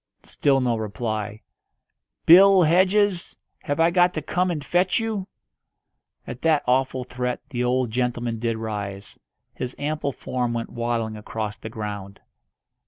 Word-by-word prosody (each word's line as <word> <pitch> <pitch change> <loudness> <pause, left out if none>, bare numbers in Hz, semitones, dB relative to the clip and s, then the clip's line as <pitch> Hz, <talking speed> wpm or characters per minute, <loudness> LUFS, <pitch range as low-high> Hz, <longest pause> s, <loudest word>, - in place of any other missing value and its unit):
Still 135 -2 +1
no 120 -2 +1
reply. 110 0 -4 0.8
"Bill 190 +2 +8
Hedges, 185 +3 +2 0.2
have 145 +1 -3
I 165 +1 +4
got 180 0 +3
to 155 - -1
come 180 +3 0
and 150 -5 -3
fetch 180 +3 +2
you?" 220 -4 -3 1.0
At 125 - -8
that 160 -3 +3
awful 130 0 +1
threat 125 0 -3
the 125 -4 -2
old 125 -1 +1
gentleman 120 -1 -1
did 115 -1 -1
rise. 100 -3 -6 0.3
His 125 0 -5
ample 145 -1 -2
form 125 -2 -3
went 115 -1 -4
waddling 115 -2 -2
across 105 0 -4
the 110 - -7
ground. 105 -2 -6
125 Hz, 140 wpm, -24 LUFS, 110-165 Hz, 1.0 s, Bill